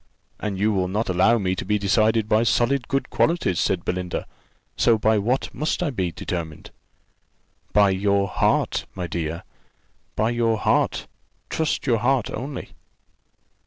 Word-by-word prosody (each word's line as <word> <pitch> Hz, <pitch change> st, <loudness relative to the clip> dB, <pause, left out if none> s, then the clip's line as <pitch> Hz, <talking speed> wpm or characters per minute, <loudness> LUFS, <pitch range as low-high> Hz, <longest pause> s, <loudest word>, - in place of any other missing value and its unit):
"And 105 Hz, -3 st, -3 dB
you 105 Hz, +3 st, +2 dB
will 95 Hz, -3 st, 0 dB
not 105 Hz, +4 st, -2 dB
allow 95 Hz, +6 st, +4 dB
me 95 Hz, -3 st, -1 dB
to -, -, -4 dB
be 105 Hz, +2 st, +1 dB
decided 110 Hz, +2 st, +2 dB
by 110 Hz, +1 st, +3 dB
solid 120 Hz, +3 st, +1 dB
good 135 Hz, -1 st, -2 dB
qualities," 165 Hz, -, +1 dB
said 95 Hz, -3 st, 0 dB
Belinda. 90 Hz, -1 st, -3 dB, 0.5 s
"So 115 Hz, -2 st, +3 dB
by 110 Hz, 0 st, +2 dB
what 120 Hz, +6 st, -1 dB
must 155 Hz, +6 st, -1 dB
I 155 Hz, -, -1 dB
be 95 Hz, -8 st, -2 dB
determined?" 85 Hz, -4 st, -6 dB, 1.0 s
"By 100 Hz, -1 st, +5 dB
your 100 Hz, +1 st, +1 dB
heart, -, -, 0 dB
my 90 Hz, -, -3 dB
dear; 85 Hz, +1 st, -4 dB, 0.7 s
by 110 Hz, +2 st, +1 dB
your 115 Hz, -2 st, +1 dB
heart: -, -, +1 dB, 0.5 s
trust 160 Hz, -1 st, -1 dB
your 120 Hz, -5 st, +2 dB
heart 125 Hz, 0 st, +1 dB
only." 135 Hz, +4 st, -6 dB
105 Hz, 150 wpm, -23 LUFS, 95-120 Hz, 1.0 s, By